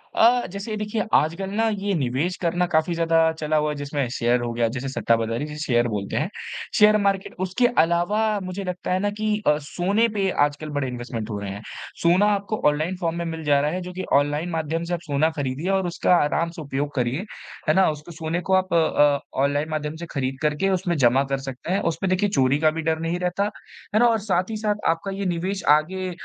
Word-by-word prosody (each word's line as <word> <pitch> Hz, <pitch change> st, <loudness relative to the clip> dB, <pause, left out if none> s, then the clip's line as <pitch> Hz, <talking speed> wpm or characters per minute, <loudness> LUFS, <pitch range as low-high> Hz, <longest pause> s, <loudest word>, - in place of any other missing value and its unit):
अ, 240 Hz, +2 st, +4 dB
जैसे 200 Hz, +3 st, -5 dB
देखिए, 210 Hz, +1 st, -2 dB
आजकल 170 Hz, +5 st, +2 dB
ना 225 Hz, +3 st, +1 dB
ये 205 Hz, -1 st, -1 dB
निवेश 145 Hz, +5 st, -1 dB
करना 175 Hz, +1 st, +1 dB
काफ़ी 160 Hz, +2 st, +2 dB
ज़्यादा 165 Hz, -1 st, +3 dB
चला 155 Hz, 0 st, 0 dB
हुआ 150 Hz, 0 st, +1 dB
है, 150 Hz, -, -3 dB
जिसमें 145 Hz, -1 st, -2 dB
शेयर 120 Hz, 0 st, +2 dB
हो 120 Hz, -1 st, -2 dB
गया 115 Hz, 0 st, +1 dB
जिसे 130 Hz, +1 st, -3 dB
सट्टाबाज़ारी 115 Hz, 0 st, 0 dB
जिसे 150 Hz, 0 st, -8 dB
शेयर 120 Hz, -1 st, +2 dB
बोलते 105 Hz, -3 st, -3 dB
हैं, 155 Hz, +5 st, 0 dB, 0.5 s
शेयर 210 Hz, 0 st, +7 dB
मार्केट। 195 Hz, -1 st, 0 dB
उसके 215 Hz, +7 st, +2 dB, 0.2 s
अलावा 175 Hz, +5 st, +1 dB, 0.2 s
मुझे 185 Hz, +2 st, -5 dB
लगता 180 Hz, -1 st, -4 dB
है 185 Hz, -, +1 dB
ना 205 Hz, +1 st, 0 dB
कि 215 Hz, 0 st, 0 dB, 0.2 s
अ, 150 Hz, -, +5 dB
सोने 190 Hz, +9 st, +1 dB
पे 195 Hz, -2 st, +1 dB, 0.2 s
आजकल 145 Hz, +1 st, -5 dB
बड़े 140 Hz, -2 st, 0 dB
इन्वेस्टमेंट 120 Hz, -3 st, -5 dB
हो 105 Hz, -, -3 dB
रहे 100 Hz, -1 st, -5 dB
हैं। 100 Hz, +1 st, -7 dB, 0.4 s
सोना 175 Hz, +4 st, +4 dB
आपको 200 Hz, +2 st, -2 dB
ऑनलाइन 155 Hz, +5 st, -1 dB
फॉर्म 165 Hz, -1 st, -1 dB
में 170 Hz, -, -2 dB
मिल 160 Hz, -1 st, -5 dB
जा 145 Hz, -2 st, +3 dB
रहा 150 Hz, +1 st, 0 dB
है 180 Hz, +2 st, -3 dB
जो 180 Hz, 0 st, -7 dB
कि 185 Hz, +1 st, -4 dB
ऑनलाइन 145 Hz, +4 st, +2 dB
माध्यम 165 Hz, 0 st, -2 dB
से 170 Hz, +1 st, -3 dB
आप 175 Hz, -, -1 dB
सोना 155 Hz, -1 st, +1 dB
खरीदिए 140 Hz, +5 st, -2 dB
और 190 Hz, -2 st, +1 dB
उसका 175 Hz, +1 st, +2 dB
आराम 165 Hz, +1 st, +1 dB
से -, -, -5 dB
उपयोग 145 Hz, 0 st, -3 dB
करिए। 130 Hz, -, -1 dB, 0.4 s
है -, -, +6 dB
ना? 190 Hz, +3 st, +4 dB
उसको 150 Hz, +2 st, -6 dB
सोने 165 Hz, +1 st, -3 dB
को -, -, +3 dB
आप 185 Hz, 0 st, +2 dB
अ, 150 Hz, -3 st, +3 dB, 0.2 s
ऑनलाइन 145 Hz, +2 st, 0 dB
माध्यम 155 Hz, 0 st, -3 dB
से 170 Hz, +1 st, -7 dB
खरीद 135 Hz, -1 st, -2 dB
करके 150 Hz, +5 st, +1 dB
उसमें 180 Hz, -2 st, 0 dB
जमा 130 Hz, 0 st, +4 dB
कर -, -, +2 dB
सकते 135 Hz, +6 st, -5 dB
हैं। 195 Hz, -, +2 dB
उस -, -, -10 dB
पे 195 Hz, -, 0 dB
देखिए, 185 Hz, +2 st, +1 dB
चोरी 135 Hz, -6 st, +2 dB
का 155 Hz, 0 st, +4 dB
भी 160 Hz, +1 st, -4 dB
डर 160 Hz, 0 st, 0 dB
नहीं 165 Hz, +2 st, -2 dB
रहता। 180 Hz, +2 st, 0 dB, 0.5 s
है -, -, +5 dB
ना? 240 Hz, -, +5 dB
और 225 Hz, -1 st, +2 dB
साथ 190 Hz, -2 st, 0 dB
ही 220 Hz, -, -3 dB
साथ 210 Hz, -1 st, 0 dB
आपका 165 Hz, +4 st, -1 dB
ये 195 Hz, +1 st, -4 dB
निवेश 185 Hz, +2 st, -2 dB
आगे 185 Hz, +4 st, -3 dB
165 Hz, 230 wpm, -23 LUFS, 145-190 Hz, 0.5 s, शेयर